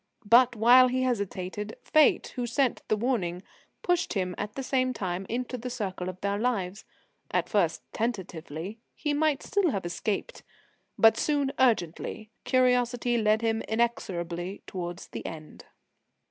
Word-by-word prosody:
But, 240 +3 +6
while 245 +3 +7
he 255 +1 0
hesitated, 205 -3 -3
Fate, 310 -2 +3
who 245 -1 -2
sent 255 +1 +1
the 215 - +1
warning, 200 -7 -1 0.4
pushed 355 -1 +1
him 185 -3 -1
at 205 +1 -5
the 270 - -4
same 255 -1 +1
time 185 -3 -3
into 250 +1 -3
the 250 +2 -5
circle 195 -7 -4
of 185 0 -8
their 200 0 -1
lives: 210 -5 -1 0.4
at - - 0
first - - +1
tentatively 190 -4 -4 0.2
he 295 -1 -1
might 295 -1 +1
still 400 -4 +1
have 195 -9 -2
escaped; 200 - -3 0.6
but 225 0 +6
soon 285 -3 +1
urgently 215 -2 0
curiosity 250 -1 +2
led 215 +1 +2
him 225 0 +1
inexorably 190 -6 -2
towards 175 -1 -5
the - - -6
end. 155 -1 -9
225 Hz, 145 wpm, -28 LUFS, 190-255 Hz, 0.6 s, while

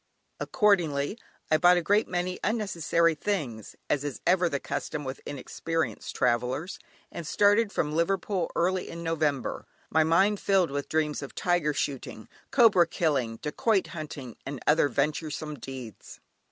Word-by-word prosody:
Accordingly, 175 -3 +1 0.3
I 155 - +6
bought 175 +3 +6
a 175 - 0
great 205 +6 +3
many 180 0 -2
unnecessary 170 -6 +1
things, 145 - -3
as 145 -1 0
is 145 -3 -4
ever 180 -1 +3
the 140 -3 -1
custom 150 +2 -4
with 130 0 -6
inexperienced 160 +4 -3
travellers, 125 +8 0 0.3
and 170 - -6
started 205 +4 +3
from 150 -6 -1
Liverpool 185 +1 0
early 180 +2 0
in 170 0 -7
November, 155 -5 -1 0.2
my 160 +1 +4
mind 190 +6 +3
filled 190 -6 +2
with 140 0 -3
dreams 155 -1 0
of 140 - -8
tiger 175 -5 +1
shooting, 130 -6 -4 0.2
cobra 210 -10 +5
killing, 135 -10 0
dacoit 195 +7 +1
hunting, 145 -7 -7
and 140 -1 -6
other 150 -1 +4
venturesome 150 +1 -2
deeds. 130 -4 -9
160 Hz, 140 wpm, -28 LUFS, 140-180 Hz, 0.3 s, I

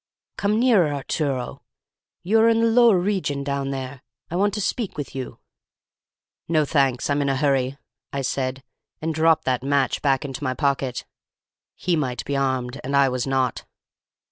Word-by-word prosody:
"'Come 210 +2 +1
nearer, 215 -11 +4
Arturo. 140 -2 -3 0.6
You 215 +5 +3
are 225 +1 +6
in 225 0 +3
the 230 - +3
lower 230 -3 +5
regions 175 -7 -1
down 140 -1 -2
there. 135 -1 -5 0.3
I - - -3
want 200 +3 +2
to - - -2
speak 210 -1 -2
with 145 - -5
you.' 130 -1 -6 1.1
"'No, 155 -2 +2
thanks. 135 -4 +1
I'm 145 0 +1
in 140 - 0
a 135 - +1
hurry,' 135 -1 +1 0.3
I 140 -1 -3
said, 130 0 -2 0.4
and 160 +1 -2
dropped 160 +1 +3
that 125 -2 0
match 140 0 +1
back 135 -1 +1
into 135 0 -6
my 130 -2 -1
pocket. 135 -3 -1 0.7
He 180 -1 0
might 130 -6 -2
be 140 - -2
armed, 130 -1 -1
and 140 +2 -2
I 140 -1 +5
was 125 0 -2
not. 130 -2 0
140 Hz, 170 wpm, -23 LUFS, 130-165 Hz, 1.1 s, are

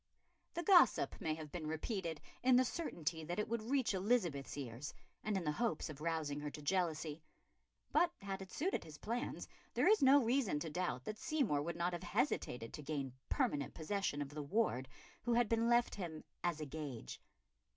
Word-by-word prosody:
The 345 - -1
gossip 355 0 +6
may 155 -1 0
have 155 -2 -8
been 165 -3 -4
repeated 165 0 -2 0.2
in 255 0 +6
the 255 +1 +6
certainty 170 - -2
that 175 +2 -3
it 210 - 0
would 230 0 -1
reach 245 0 +1
Elizabeth's 185 - +1
ears 130 +1 -5 0.3
and 215 -2 0
in 185 - -1
the 150 - +1
hope 230 +8 0
of 150 -1 -8
rousing 155 -3 -1
her 150 0 -3
to 150 - -8
jealousy. 160 -3 0 0.7
But 345 -1 +4
had 195 -1 -4
it 190 - -8
suited 365 +6 0
his 150 -1 -10
plans, 235 - -3 0.3
there - - +4
is 430 +1 +6
no 275 0 +7
reason 230 - +2
to 160 - -3
doubt 150 -7 -1
that 215 +6 -5
Seymour 255 - +1
would 170 +3 -3
not 175 +1 0
have 175 - -3
hesitated 125 -8 -1
to - - -6
gain 140 -3 -3 0.2
permanent 230 - 0
possession 160 -3 -1
of 140 - -8
the 150 +1 -5
ward 140 - +1 0.3
who 240 - +1
had 240 -1 +4
been 230 +1 +2
left 240 0 +4
him 170 -6 -5 0.2
"as 175 -3 0
a 155 - -3
gage." 140 - -6
170 Hz, 195 wpm, -38 LUFS, 150-230 Hz, 0.7 s, no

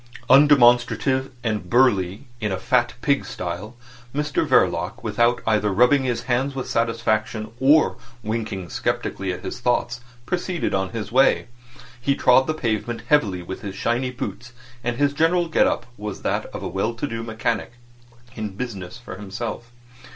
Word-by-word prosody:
Undemonstrative 130 -1 +5
and 105 -6 -2
burly 100 -7 +2
in 105 -3 -2
a 95 - -1
fat 120 +4 +1
pig 140 -1 +2
style, 90 +7 -6 0.4
Mr 150 0 0
Verloc, - - +2
without 120 +1 +1
either 105 -2 +2
rubbing 125 +6 +4
his 120 -2 -1
hands 130 +3 0
with 130 - -4
satisfaction 110 -1 -1
or 145 +4 +4 0.3
winking 105 -4 -3
sceptically 95 +2 -2
at 90 0 -6
his - - -5
thoughts, 120 0 0 0.2
proceeded 180 +1 -2
on 95 0 0
his 115 0 -5
way. 135 +3 +4 0.6
He 140 +3 +1
trod 130 0 +4
the 155 - 0
pavement 115 -3 -2
heavily 100 -12 +2
with 95 - -7
his 100 -2 -6
shiny 120 +4 0
boots, 120 -1 -6 0.3
and 120 +1 -1
his 145 0 +2
general 170 +4 +2
get 160 - +3
up - - -1
was 105 -1 -6
that - - -1
of - - -8
a - - -2
well 100 +6 -2
to 120 - -3
do 115 -4 -4
mechanic 115 +1 -2 0.6
in 105 -3 -5
business 110 -3 -6
for 120 -6 -9
himself. 110 +4 -6
120 Hz, 160 wpm, -23 LUFS, 105-130 Hz, 0.6 s, Undemonstrative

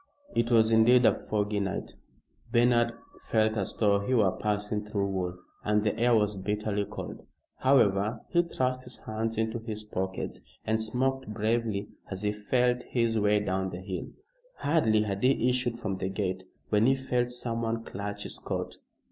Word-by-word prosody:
It 115 0 +1
was 115 -2 +5
indeed 120 +2 +6
a - - +6
foggy 105 -1 -1
night. 95 -2 -3 0.6
Bernard 120 0 +4 0.4
felt 110 -1 +3
as 100 -3 -2
though 100 -2 +3
he 115 +6 0
were 105 -5 +4
passing 105 +1 -1
through 105 -1 -1
wool, 90 -2 -2 0.3
and 105 0 +2
the 105 0 +1
air 120 +1 +3
was 105 -1 +2
bitterly 105 +1 -1
cold. - - -7 0.4
However, 110 -5 +3
he 175 - +4
thrust 130 -6 -1
his 125 -2 -6
hands 110 +1 -3
into 110 +1 0
his 110 -1 -5
pockets 95 -3 -4 0.2
and 110 0 +1
smoked 130 +4 0
bravely 110 -1 -1 0.2
as 95 +1 -5
he 105 - +2
felt 125 +4 +1
his 115 -2 +1
way 105 0 +3
down 95 -1 -1
the 90 - -6
hill. 95 0 -5 0.5
Hardly 110 -9 +2
had 100 -1 -3
he 125 -1 +3
issued 125 -2 0
from 100 -5 -2
the 95 0 -2
gate 95 -1 -2 0.2
when 105 +2 +4
he 135 - +5
felt 125 -2 0
someone 115 -2 -2
clutch 100 0 -5
his - - -6
coat. - - -4
110 Hz, 170 wpm, -29 LUFS, 100-120 Hz, 0.6 s, indeed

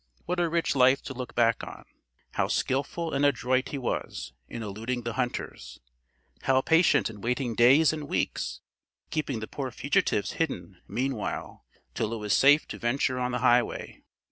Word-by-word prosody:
What 180 +1 -1
a 170 -1 +2
rich 165 -2 0
life 130 +1 +4
to 135 - -6
look 125 -1 -7
back 115 -1 +3
on! - - -9 0.5
How - - 0
skilful 145 +5 -1
and 140 +1 +1
adroit 130 -2 +2
he 145 - -4
was, 125 - -4 0.2
in 115 - -5
eluding 115 +4 -4
the 115 0 -3
hunters! 120 - -4 0.6
How 135 -1 +3
patient 160 -3 +4
in 105 -3 -9
waiting 125 +1 -1
days 135 +8 +5
and 150 -2 -5
weeks, - - -2 0.5
keeping 145 -7 -2
the 110 - -5
poor 135 -2 -4
fugitives 125 -5 0
hidden 90 - -3
meanwhile, 130 -2 -3 0.3
till 115 -1 -2
it - - -2
was 105 -3 +1
safe 145 +3 +5
to - - -6
venture 125 +2 0
on 125 0 -1
the 125 - -1
highway! 120 -1 +1
125 Hz, 170 wpm, -28 LUFS, 115-140 Hz, 0.6 s, days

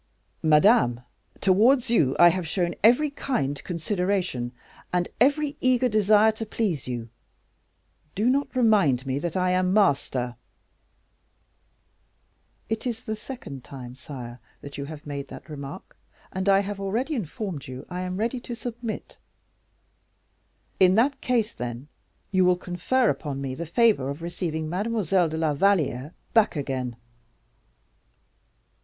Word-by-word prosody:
"Madame, 155 - +4 0.4
towards 230 +6 +4
you 140 - +3
I 175 - +8
have 180 -1 -2
shown 175 0 0
every 250 +7 +5
kind 145 - -2
consideration, 180 - -1 0.4
and 175 -1 +1
every 290 +4 +2
eager 255 0 +3
desire 215 0 +4
to 220 +1 -6
please 200 - -2
you; 120 -2 -4 1.1
do 215 +4 +1
not 275 +2 +1
remind 200 - +3
me 135 +1 -1
that 170 +3 -3
I 180 0 +2
am 185 0 +2
master." 135 - +1 2.3
"It 225 +3 -2
is 230 -2 -4
the 220 - -3
second 215 - -8
time, 125 -2 -9
sire, 125 -2 -9 0.2
that 140 -1 -9
you 140 - -4
have 150 0 -9
made 140 -1 -5
that - - -11
remark, 145 +2 -8 0.4
and 190 +1 0
I 195 0 +5
have 200 0 -5
already 225 +10 -1
informed 190 - -4
you 130 +1 -8
I 180 0 -5
am 185 0 -3
ready 235 +4 -1
to 240 0 -6
submit." 235 -1 -6 1.6
"In 185 0 +6
that 270 +5 +2
case, 235 -3 +1
then, 120 +3 -6 0.4
you 190 -1 +4
will 180 0 +4
confer 180 +8 +1
upon 145 -3 -5
me 135 -1 -3
the 165 +5 -5
favor 205 - +3
of 145 +4 -6
receiving 165 -2 -3
Mademoiselle 190 -1 +1
de 160 - -4
la 160 -2 +1
Valliere 150 -5 +1 0.2
back 225 -5 +4
again." 130 -4 -3
180 Hz, 135 wpm, -25 LUFS, 145-220 Hz, 2.3 s, I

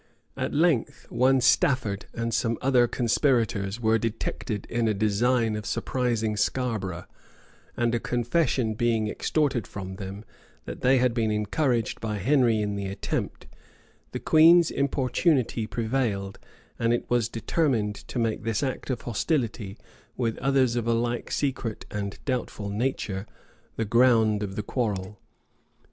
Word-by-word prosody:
At - - -2
length, 145 -5 +1
one 130 +2 +3
Stafford, 120 -4 +2
and 115 0 -3
some 115 -1 0
other 125 -2 +3
conspirators, 115 -5 +1
were 110 -1 +2
detected 110 -2 -3
in 120 -1 0
a 110 - +1
design 110 +2 +1
of 105 - -4
surprising 115 -4 -1
Scarborough;[*] 105 -5 -2 0.7
and 120 0 +1
a 120 - +1
confession 120 -1 0
being 110 -1 +1
extorted 130 -1 0
from 95 -1 -7
them, 100 +2 -7 0.4
that - - -7
they 130 +1 +4
had 125 -1 +2
been 115 -2 0
encouraged 115 +3 0
by 110 -1 -2
Henry 120 0 +3
in 105 -1 -2
the 100 -1 -3
attempt, 100 - -4 0.7
the - - -4
queen's 165 +2 +6
importunity 130 -3 +1
prevailed; 110 -5 -2 0.4
and 115 0 +2
it 120 - -2
was 120 -2 +1
determined 115 -3 0
to 115 - -9
make 115 -2 0
this 115 +2 -1
act 130 0 -3
of 125 -3 -2
hostility, 115 - -2 0.4
with 115 -3 0
others 135 -2 +2
of 120 -1 -1
a 115 - +3
like 120 +1 -2
secret 130 -6 -2
and 100 -1 -4
doubtful 120 -5 -3
nature, 105 -3 -2 0.5
the 115 - -1
ground 110 -2 +4
of 100 -2 -4
the 105 - -3
quarrel. 105 -4 -3
115 Hz, 140 wpm, -26 LUFS, 105-125 Hz, 0.7 s, queen's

